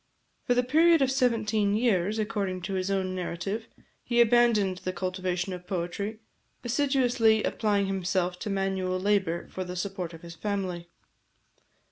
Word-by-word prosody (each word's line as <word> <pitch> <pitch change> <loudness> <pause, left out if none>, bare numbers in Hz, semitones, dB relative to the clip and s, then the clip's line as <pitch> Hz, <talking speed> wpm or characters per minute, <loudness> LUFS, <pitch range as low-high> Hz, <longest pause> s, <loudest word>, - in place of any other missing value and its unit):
For 245 - +2
the 250 - +3
period 320 +4 +5
of 265 - +1
seventeen 220 -6 +1
years, 215 -3 +1
according 205 -4 -2
to 195 +2 -3
his 185 0 -1
own 190 -1 0
narrative, 185 +5 -4 0.4
he 240 -1 0
abandoned 225 -5 +4
the 185 - -4
cultivation 185 0 -2
of 180 0 -9
poetry, 200 +4 -3 0.4
assiduously 240 -4 +2
applying 205 -2 +1
himself 185 -1 -1
to 215 - -4
manual 190 -2 -1
labour 190 -4 0
for 185 - -4
the 180 0 -6
support 180 -2 -4
of 165 - -14
his 170 0 -9
family. 180 -2 -3
195 Hz, 145 wpm, -28 LUFS, 185-225 Hz, 0.4 s, period